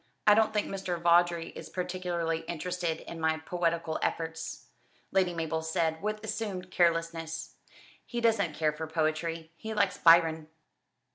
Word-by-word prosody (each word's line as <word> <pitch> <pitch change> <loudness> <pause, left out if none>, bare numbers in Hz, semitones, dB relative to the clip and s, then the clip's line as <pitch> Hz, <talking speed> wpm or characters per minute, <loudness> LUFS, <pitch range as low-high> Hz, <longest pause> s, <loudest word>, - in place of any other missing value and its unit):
"I 210 - +8
don't 220 0 +4
think 210 -1 0
Mr. 185 -3 -3
Vawdrey 170 0 +3
is - - -9
particularly 180 -3 -2
interested 175 -1 -2
in 170 - -8
my 160 0 +1
poetical 165 -1 -1
efforts," 160 0 -3 0.5
Lady 185 -2 +3
Mabel 160 -1 -2
said 160 0 -1
with 215 +1 -3
assumed 200 -4 -4
carelessness. 165 -2 0 0.5
"He 240 - -4
doesn't 210 -9 +2
care 155 -1 +1
for 160 +1 -5
poetry. 160 +1 -1
He 220 +3 -5
likes 200 -3 +1
Byron." 165 -2 +5
170 Hz, 140 wpm, -30 LUFS, 160-185 Hz, 0.5 s, I